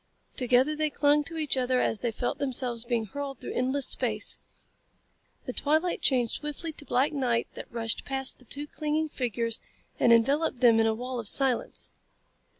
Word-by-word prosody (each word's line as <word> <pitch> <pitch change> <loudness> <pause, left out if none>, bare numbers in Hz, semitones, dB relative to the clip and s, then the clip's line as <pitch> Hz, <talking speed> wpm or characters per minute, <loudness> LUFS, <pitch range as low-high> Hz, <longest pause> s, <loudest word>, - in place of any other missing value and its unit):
Together 255 +4 +3
they 305 0 0
clung 295 +1 +3
to 325 +3 -7
each 305 -3 +1
other 255 -1 +1
as 225 - 0
they 240 - -1
felt 245 +5 -3
themselves 250 -4 -1
being 235 -2 0
hurled 275 +5 -5
through - - -6
endless 260 +2 +1
space. - - 0 1.1
The - - -4
twilight 315 +4 +1
changed 245 -5 +3
swiftly 300 +2 -5
to 290 - -7
black 270 +4 +2
night 245 -5 +1
that - - -9
rushed 230 -1 -2
past 270 -1 -2
the 250 - -16
two 285 +5 -4
clinging 305 +1 -1
figures 230 -4 -2 0.4
and - - +5
enveloped 275 +5 +3
them 235 -3 +6
in 225 - +4
a 220 - +1
wall 250 +2 -4
of 220 - -2
silence. 265 +1 +1
260 Hz, 175 wpm, -28 LUFS, 240-290 Hz, 1.1 s, them